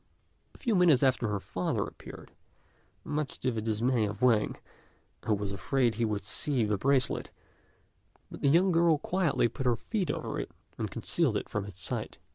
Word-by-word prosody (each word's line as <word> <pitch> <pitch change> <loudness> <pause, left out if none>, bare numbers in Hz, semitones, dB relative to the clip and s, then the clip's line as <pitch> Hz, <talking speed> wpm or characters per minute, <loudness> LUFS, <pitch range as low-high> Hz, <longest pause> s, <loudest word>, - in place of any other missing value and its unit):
A - - -13
few 240 -5 0
minutes 170 -8 +5
after 130 -3 +2
her 105 -1 -1
father 90 -1 -2
appeared, - - -11 0.7
much 150 -2 -3
to 130 - +1
the 110 -2 -3
dismay 115 +2 +1
of 100 0 -6
Wang, 115 -4 +3 0.7
who 110 - +3
was 100 -1 -3
afraid 120 +5 +1
he 115 +1 0
would 105 -2 -2
see 125 +5 +1
the 105 0 +1
bracelet; 130 +4 +1 1.0
but - - -9
the 140 - +3
young 180 +6 +4
girl 165 -2 +4
quietly 170 -5 +1
placed 130 - -6
her 120 -1 +3
feet 195 - -3
over - - -3
it, - - -4 0.3
and - - -2
concealed - - 0
it - - -5
from 105 -2 -2
his 100 -3 -10
sight. - - -4
125 Hz, 180 wpm, -30 LUFS, 105-150 Hz, 1.0 s, minutes